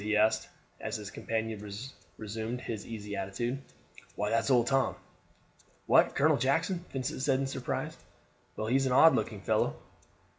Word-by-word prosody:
he 105 +1 +1
asked, 110 +1 +3 0.3
as - - -4
his 105 -2 -6
companion 110 -2 -3 0.5
resumed 110 +3 -4
his 110 -4 -5
easy 105 -3 -5
attitude. 120 +7 -2 0.5
"Why, 105 0 -1
that's 115 +3 +2
Old 125 -3 +5
Tom." 135 +1 +2 0.9
"What! - - +5
Colonel 150 +1 +4
Jackson!" 165 +7 +1
Vincent 130 -1 -3
said 135 -1 +2
in 135 - 0
surprise. 135 - -3 0.6
"Well, 110 - -3
he 120 +4 +3
is 135 0 +1
an 125 - +1
odd 160 +5 +8
looking 105 -3 -1
fellow." - - +1
115 Hz, 155 wpm, -31 LUFS, 105-135 Hz, 0.9 s, odd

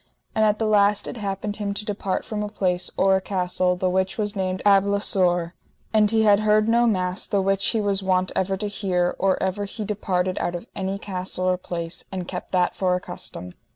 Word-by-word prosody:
And 220 - +2
at 210 0 +3
the 225 - -1
last 205 -1 +3
it - - -6
happened 205 0 -3
him 200 -1 -3
to 210 - -5
depart 200 -2 -2
from 215 -1 -4
a 210 - -3
place 185 -4 -1
or 195 0 +4
a 190 - +1
castle 180 -1 0
the 185 +1 -1
which 190 +1 0
was 210 -1 -2
named 185 -1 -2
Abblasoure; 195 -3 +3 0.4
and 215 -1 +4
he 220 0 +3
had 205 -1 +5
heard 215 0 +3
no 235 +1 +4
mass, 185 -3 0
the 200 - +1
which 195 0 +1
he 225 - +1
was 200 -1 +2
wont 185 -1 +1
ever 190 +1 0
to 210 +2 -3
hear 185 -3 -1
or 190 0 +2
ever 190 +2 -1
he 210 +2 -6
departed 185 -3 -1
out 175 - -2
of 175 - -6
any 195 0 -2
castle 185 -2 -3
or 185 0 +3
place, 170 -2 -5
and 185 -2 -4
kept 180 - -6
that 180 -1 +1
for 185 -1 +1
a - - -1
custom. 175 - -7
195 Hz, 220 wpm, -23 LUFS, 185-205 Hz, 0.4 s, had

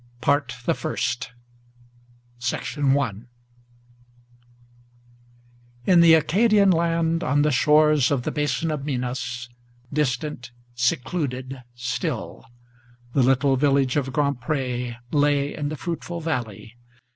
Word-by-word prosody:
PART 140 -2 +1
THE - - +2
FIRST. 120 - -3 1.2
I 135 -1 0 2.7
IN 175 -2 +6
the 165 -1 +8
Acadian 200 +5 +4
land, 165 0 +1
on 145 +3 +2
the 150 - +2
shores 150 0 +4
of 135 -4 0
the - - -2
Basin 150 +2 -1
of 150 -3 -3
Minas, 125 -3 -3 0.5
Distant, 135 -2 -2 0.2
secluded, 130 +1 -2
still, 120 -1 -4 0.7
the 140 - +3
little 135 +1 +3
village 135 -2 +2
of 135 -3 -1
Grand 140 -2 0
Pré 125 -3 -2 0.2
Lay 145 -1 +2
in 145 -2 -3
the 155 - -5
fruitful 170 +1 -5
valley. 115 -9 -4
140 Hz, 105 wpm, -23 LUFS, 125-155 Hz, 2.7 s, the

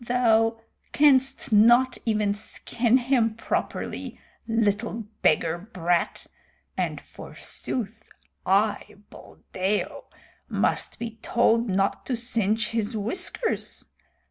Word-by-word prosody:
Thou 225 -2 +3 0.3
canst 270 -4 +3
not 240 +4 +5
even 210 -2 +1
skin 230 +3 0
him 240 -3 +1
properly, 230 - -4 0.3
little 225 0 0 0.2
beggar 160 +2 +2
brat, 175 -4 -1 0.5
and - - -2
forsooth 225 -2 -5 0.3
I, 205 +2 +1 0.2
Buldeo, 190 +3 -4 0.4
must - - 0
be 225 -1 -6
told 230 -1 +2
not 195 +1 0
to 255 - 0
singe 225 -2 0
his 225 0 -2
whiskers. 360 - -2
225 Hz, 90 wpm, -25 LUFS, 205-240 Hz, 0.5 s, not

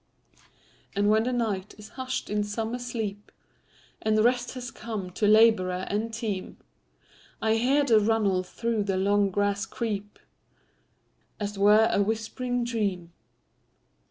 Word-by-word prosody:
And 205 +1 +3
when 220 +1 +3
the 255 - 0
night 215 -5 -2
is 210 0 -12
hush'd 260 -3 -4
in 210 0 +1
summer 225 +3 -3
sleep, 220 -4 -5 0.7
And 215 0 +1
rest 245 +1 +1
has 250 0 -6
come 210 -5 -6
to 210 +3 0
laborer 205 -4 +4
and 215 +3 -1
team,I 185 - -6
hear 260 +6 +3
the 230 -6 +5
runnel 210 -3 +2
through 220 +3 -2
the 195 -2 0
long 200 +1 +2
grass 205 +1 0
creep, 205 -3 -4 1.2
As 205 -1 -2
't 200 - -9
were 210 +2 +6
a - - +2
whispering 225 +4 -2
dream. 200 -8 -2
215 Hz, 130 wpm, -27 LUFS, 200-230 Hz, 1.2 s, were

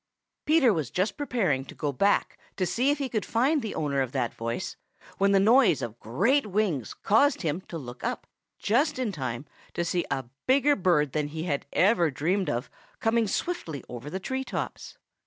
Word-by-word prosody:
Peter 295 -7 +5
was 155 -8 -2
just 185 - -1
preparing 220 - 0
to 135 - -12
go 145 -2 -2
back 200 +10 +1 0.2
to 185 - +1
see 250 +9 +1
if 290 - +2
he 275 -1 -2
could 220 -4 -2
find 270 +6 +2
the 220 -3 -5
owner 140 -3 0
of 130 -2 -3
that 125 -4 -1
voice 115 +1 -4 0.4
when 200 0 +4
the 195 - +5
noise 225 - +5
of 120 0 -6
great 210 - +1
wings 190 - -1
caused 225 +4 +3
him 160 +2 -1
to 170 - -7
look 125 -4 -9
up - - -3 0.3
just 270 +8 +1
in 250 -5 -1
time 130 -5 -4 0.3
to 170 - 0
see 175 +1 0
a 135 -2 -2 0.2
bigger 280 +2 +4
bird 170 -7 +2
than 150 +1 -1
he 155 +2 -5
ever 175 - -1 0.5
had 160 - +1
even - - -17
dreamed 185 +8 0
of 120 +3 -2 0.3
coming 225 0 +2
swiftly 190 - -3
over 125 +4 -7
the 190 - -4
tree 260 +6 -3
tops. - - -5
185 Hz, 195 wpm, -27 LUFS, 145-235 Hz, 0.5 s, Peter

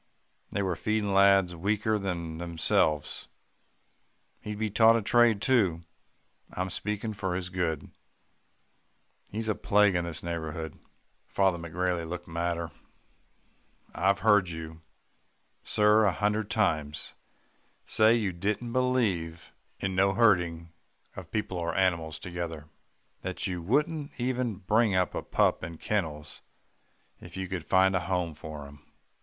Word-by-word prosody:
They 100 - -1
were 90 -2 -1
feeding 110 +1 -1
lads 95 -2 +5
weaker 105 +4 0
than 85 -4 -4
themselves. 80 -3 0 1.1
He'd 105 -1 -6
be 110 -1 -2
taught 110 +2 +6
a 115 - +1
trade 115 -1 +4
too. 100 -10 +2 0.7
I'm 90 0 -3
speaking 105 +3 -3
for 95 -3 -2
his 90 0 -4
good. 85 -5 -2 1.4
He's 110 +2 -4
a 110 - +2
plague 105 0 +3
to 90 - +1
this 85 -2 -5
neighbourhood.' 80 -2 -5 0.5
"Father 95 -3 +1
McGrailey 85 0 -2
looked 85 0 -6
madder. 85 0 -2 1.2
'I've 100 +1 +1
heard 105 -5 +4
you, 80 -1 -7 0.8
sir, 105 +1 +4
a 100 - +4
hundred 105 +3 -1
times, 75 -9 -1 0.7
say 110 +1 +4
you 105 -5 0
didn't 105 +6 -2
believe 105 -11 0 0.3
in 95 -1 -2
no 95 +1 +3
herding 90 -6 +2 0.4
of 90 -3 -9
people 100 -4 -2
or 85 0 -2
animals 85 -5 +1
together 85 -4 -6 0.5
that - - -3
you 90 -2 -2
wouldn't 145 - -1
even 125 -2 -1
bring 105 +2 +2
up 90 -1 +1
a - - -2
pup - - +1
in 80 0 -6
kennels, 75 -8 -3 0.8
if - - -11
you 95 -1 -3
could 90 -2 -4
find 95 +1 +3
a - - +3
home 90 -2 -2
for 75 -1 -8
him. 70 +1 -14
95 Hz, 135 wpm, -28 LUFS, 85-105 Hz, 1.4 s, taught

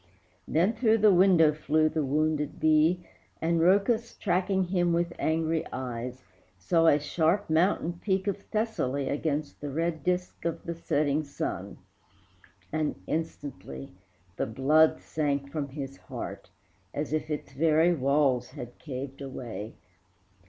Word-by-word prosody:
Then 180 +8 +2
through 225 -1 +3
the 210 -2 +5
window 175 -4 +5
flew 155 +1 +2
the 155 -1 -1
wounded 150 +1 0
bee, 155 +3 +3 0.3
And 165 +1 +1
Rhœcus, 205 +6 +2
tracking 190 0 +1
him 175 -1 +1
with 170 0 0
angry 160 0 +1
eyes, 125 0 -5 0.3
Saw 165 - +2
a 145 - +6
sharp 165 +5 0
mountain 170 0 +2
peak 190 -1 +1
of 200 -1 -2
Thessaly 145 - -1
Against 150 0 -2
the 145 - -4
red 160 +1 -2
disc 180 0 -1
of 170 -1 -2
the 170 - -3
setting 150 -2 0
sun, 140 - -5 0.9
And 155 -1 -1
instantly 115 - -5 0.4
the - - -1
blood 150 +8 +4
sank 140 -2 -2
from 145 -2 -3
his 135 -1 -6
heart, - - -7 0.5
As 150 +1 -2
if 155 0 -1
its 150 -2 -4
very 160 +4 +3
walls 140 -4 +2
had 120 -5 -9
caved 135 -1 -6
away. 120 -5 -6
155 Hz, 135 wpm, -28 LUFS, 140-175 Hz, 0.9 s, a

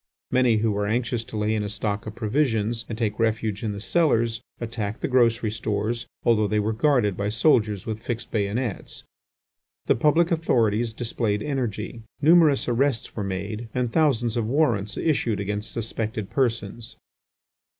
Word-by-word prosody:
Many 125 -3 +4
who 110 0 +1
were 100 0 -1
anxious 115 +1 -1
to 110 - -7
lay 105 +1 +1
in 110 - 0
a 105 - -3
stock 105 0 -2
of 110 - -6
provisions 115 -2 0
and 110 - -4
take 110 -2 -1
refuge 110 -2 0
in 110 - -2
the 100 - -5
cellars, 115 - +1 0.2
attacked 110 -3 -4
the - - 0
grocery 115 -4 +2
stores, 110 +2 -2 0.2
although 110 -3 +3
they 105 +1 +1
were 105 +2 0
guarded 120 -5 +2
by 100 +2 -2
soldiers 105 - +2
with 110 0 -4
fixed 120 0 -4
bayonets. 105 +1 -2 0.8
The - - +4
public 160 +7 +3
authorities 120 -8 +2
displayed 110 -2 -2
energy. 120 -5 -3 0.2
Numerous 155 -2 +5
arrests 125 0 0
were 105 - -2
made 100 +4 -4
and 125 -2 -1
thousands 125 -7 +2
of 115 -2 0
warrants 120 -6 +1
issued 120 -9 0
against 105 +2 -3
suspected 110 -2 -3
persons. 115 -3 -1
115 Hz, 160 wpm, -25 LUFS, 105-120 Hz, 0.8 s, Numerous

